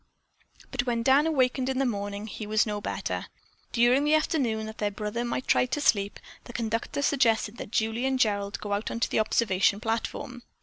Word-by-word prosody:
But 250 -1 -2
when 235 -1 0
Dan 275 +5 +5
awakened 260 -3 +1
in 265 - -1
the 270 - +2
morning 205 -2 -3
he 215 0 -7
was 215 0 +3
no 210 -1 -3
better. - - -3 0.4
During 245 +4 +4
the 300 +1 +4
afternoon, 250 -8 0
that 220 0 -9
their 210 - +1
brother 210 +3 -3
might 240 +2 -2
try 250 - +3
to 280 - -2
sleep, 200 -7 +2 0.3
the 240 - -10
conductor 230 +4 -2
suggested 230 -5 +2
that - - -7
Julie 225 +4 0
and 265 0 +1
Gerald 200 -4 0
go 205 -1 -3
out 205 +2 -1
on 230 - -4
the - - +2
observation 200 -2 +2
platform. 230 +2 -3
230 Hz, 190 wpm, -27 LUFS, 210-255 Hz, 0.4 s, Dan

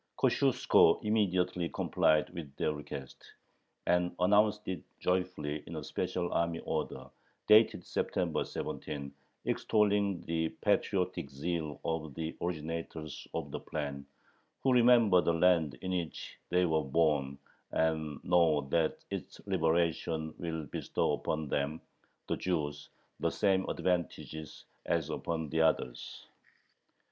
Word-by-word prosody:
Kosciuszko - - +4
immediately 90 -5 +1
complied 75 +2 +2
with 80 -6 -8
their 75 - 0
request, 70 -3 -8 0.6
and 90 0 +2
announced 105 +3 +3
it 95 - -3 0.2
joyfully 90 -5 -1
in 80 - -6
a 75 - -4
special 85 +4 -2
army 85 0 +1
order, - - -3 0.4
dated 110 +1 +5
September - - -1
17, 70 -1 -5 0.3
extolling 100 -3 +2
the 80 -1 -1
patriotic 70 - +1
zeal 75 +1 -3
of 80 -3 -2
the 80 0 -4
originators 80 -2 -4
of - - -3
the - - -4
plan, 70 -3 -4 0.6
"who 130 - +4
remember 120 -6 +6
the 85 - +2
land 85 -5 +3
in 95 - -2
which 85 -3 -4
they 90 +1 +3
were 80 -2 +2
born, 70 -2 +1 0.3
and 80 -2 0
know 80 -4 +4
that 80 -2 +1
its - - -6
liberation 80 -1 0
will 80 -2 -3
bestow - - -1
upon 80 -1 -2
them 70 +3 -1 0.5
[the - - -1
Jews] 75 -5 -2 0.3
the - - +1
same 95 -2 +1
advantages 85 -4 -3 0.2
as - - 0
upon 80 -2 -3
the 80 +2 +1
others." 70 -6 0
80 Hz, 120 wpm, -32 LUFS, 75-90 Hz, 0.6 s, remember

